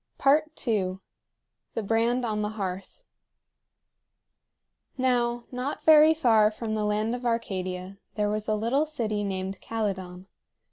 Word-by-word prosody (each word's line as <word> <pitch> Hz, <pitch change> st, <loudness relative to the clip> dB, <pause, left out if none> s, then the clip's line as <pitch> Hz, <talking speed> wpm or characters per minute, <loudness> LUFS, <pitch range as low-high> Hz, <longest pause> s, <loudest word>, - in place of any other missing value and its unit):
II. 260 Hz, -10 st, +2 dB, 0.8 s
THE 225 Hz, -, -1 dB
BRAND 230 Hz, +4 st, +1 dB
ON 215 Hz, -2 st, -1 dB
THE 210 Hz, -, -1 dB
HEARTH. 195 Hz, -, -6 dB, 1.9 s
Now, 240 Hz, -2 st, +1 dB
not 255 Hz, +3 st, -4 dB
very 315 Hz, 0 st, +7 dB
far 225 Hz, -8 st, +4 dB
from 220 Hz, 0 st, -5 dB
the 215 Hz, -1 st, -1 dB
land 210 Hz, +2 st, 0 dB
of 245 Hz, 0 st, -5 dB
Arcadia 190 Hz, -5 st, -3 dB, 0.2 s
there 210 Hz, -1 st, +1 dB
was 210 Hz, 0 st, -2 dB
a 215 Hz, -, +1 dB
little 245 Hz, +8 st, +1 dB
city 220 Hz, -8 st, -2 dB
named 190 Hz, -1 st, -4 dB
Calydon. 190 Hz, -5 st, -4 dB
220 Hz, 125 wpm, -27 LUFS, 200-245 Hz, 1.9 s, very